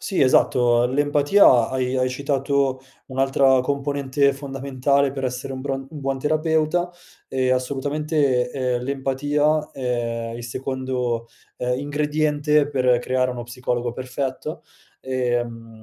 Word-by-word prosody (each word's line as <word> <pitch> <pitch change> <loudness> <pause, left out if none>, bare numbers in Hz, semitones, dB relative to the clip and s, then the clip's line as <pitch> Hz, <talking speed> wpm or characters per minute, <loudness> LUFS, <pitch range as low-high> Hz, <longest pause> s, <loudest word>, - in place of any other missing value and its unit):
Sì 195 - -2
esatto, 120 -2 +4
l'empatia 145 - +4
hai 130 0 -1
hai 130 0 +2
citato 135 0 0 0.3
un'altra 135 0 +3
componente 140 0 0
fondamentale 135 0 0
per 135 -1 -4
essere 130 +2 -3
un 130 - -5
buon 135 0 -3
un 150 - -8
buon 135 -1 -2
terapeuta, 160 +3 +1 0.4
ehm, 130 -1 +1
assolutamente, 140 0 0
ehm, 125 -2 -1
l'empatia 145 +3 0
è 120 -3 -2
il 120 - -7
secondo, 125 -2 -3 0.3
ehm, 125 +1 -1
ingrediente 150 0 +1
per 125 -3 +2
creare 130 +1 0
uno 120 -1 -5
psicologo 120 0 -3
perfetto. 130 +5 -4 0.4
Ehm, 120 -3 -3
135 Hz, 120 wpm, -22 LUFS, 125-145 Hz, 0.4 s, esatto